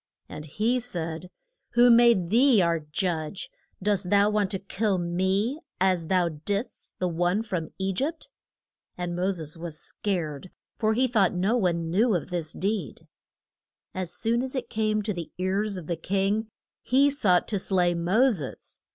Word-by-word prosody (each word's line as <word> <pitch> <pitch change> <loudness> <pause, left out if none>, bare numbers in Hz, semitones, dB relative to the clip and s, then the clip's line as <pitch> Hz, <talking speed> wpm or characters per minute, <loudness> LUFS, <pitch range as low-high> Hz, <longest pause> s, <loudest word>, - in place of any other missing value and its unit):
And 150 - -8
he 220 - 0
said, 175 -7 -5 0.4
Who 240 0 +6
made 230 -7 +5
thee 245 0 +5
our 170 -2 +2
judge? 160 +2 -3 0.3
Dost 200 -3 +1
thou 205 +1 +4
want 210 -2 +1
to 195 - -2
kill 200 +1 -1
me, 190 - 0 0.2
as 185 -3 +1
thou 180 -1 +2
didst 200 - -5
the 185 - 0
one 175 +5 0
from 180 -7 -3
E 190 0 -1
gypt? 300 - -3 0.7
And 175 -1 -3
Mo 180 +2 0
ses 165 -4 -5
was 165 -2 -6
scared, 175 -6 -4 0.3
for 220 -1 +2
he 255 +2 +3
thought 205 -7 +2
no 195 +6 +1
one 170 -7 0
knew 215 +4 +3
of 175 +2 -3
this 165 -3 -2
deed. 195 - -3 0.9
As 185 -2 -3
soon 230 +5 +1
as 260 +1 -4
it 260 - -4
came 215 -1 0
to 210 0 -2
the 170 -3 -6
ears 195 +2 -1
of 175 - -7
the 170 +1 -3
king, 195 +5 0 0.3
he 275 +3 +3
sought 190 -11 +2
to 205 - 0
slay 180 -2 +1
Mo 190 +10 +3
ses. 150 - -5
190 Hz, 170 wpm, -26 LUFS, 175-215 Hz, 0.9 s, Who